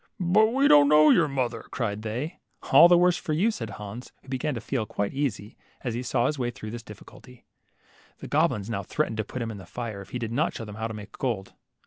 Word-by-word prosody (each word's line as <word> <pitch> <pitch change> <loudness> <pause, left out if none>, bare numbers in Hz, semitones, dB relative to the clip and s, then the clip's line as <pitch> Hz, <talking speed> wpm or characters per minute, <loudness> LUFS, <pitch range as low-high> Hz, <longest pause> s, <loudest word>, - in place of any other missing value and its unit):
But 195 +5 +4
we 270 +5 +2
don't 145 -1 +7
know 150 0 +7
your 165 -3 +4
mother," 125 -4 -2
cried 105 -4 -3
they. 125 +10 -4 0.3
All 170 - +9
the 175 0 +6
worse 180 0 +4
for 155 - -3
you," 195 +9 +2
said 115 - -6
Hans, 105 +4 -8
who - - -16
began 130 +2 -2
to - - -3
feebquite 110 -4 -3
easy, 120 -6 -3 0.3
as 120 - -3
he 120 - -3
saw 125 -1 0
his 145 +1 -1
way 120 -1 0
through 110 -3 -8
his 120 +1 -6
diffi 105 -2 -12
culties. 125 -2 -16 0.7
The - - -9
goblins 100 -1 +1
now 115 -4 -2
threatened 110 +4 -2
to 110 - 0
put 120 +4 -5
him 115 - -4
in 105 - -8
the 95 -3 -11
fire 115 -3 -6
if 100 - -12
he 125 - -4
did 115 -2 -4
not 150 +7 0
show 115 - -5
them 105 - -9
how 110 0 -2
to 110 - -7
make 105 -1 -9
gold. 110 -7 -2
120 Hz, 250 wpm, -26 LUFS, 110-150 Hz, 0.7 s, All